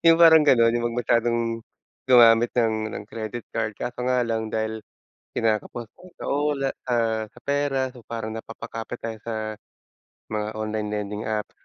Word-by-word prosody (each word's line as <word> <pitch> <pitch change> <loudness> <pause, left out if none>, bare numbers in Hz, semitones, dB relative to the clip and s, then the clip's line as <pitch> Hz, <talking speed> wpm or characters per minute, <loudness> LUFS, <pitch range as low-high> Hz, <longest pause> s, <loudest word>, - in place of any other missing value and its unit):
yung 165 - +8
parang 160 -1 +9
ganun. 115 -5 +5
Yung 120 - -1
'wag 120 +1 -4
masyadong 120 0 +2 0.7
gumamit 120 -2 +7
ng 110 -2 +1
ng - - -6
credit 110 +1 -5
card, 110 -1 0
kaso 125 0 -4
nga 125 0 +2
lang 110 -1 -1
dahil 110 0 -2 0.6
kinakapos 115 +1 -1 0.3
sa - - -6
ula 145 -1 +1 0.2
ah, 115 -2 +1
sa - - -18
pera, 140 -2 +1
so 125 - -13
parang 115 -1 -4
napapakapit 115 +1 -7
tayo 115 -1 -4
sa 115 - -2 1.0
mga 105 0 -1
online 110 -1 -2
lending 105 0 -3
apps. 105 -1 -2
115 Hz, 155 wpm, -25 LUFS, 110-125 Hz, 1.0 s, parang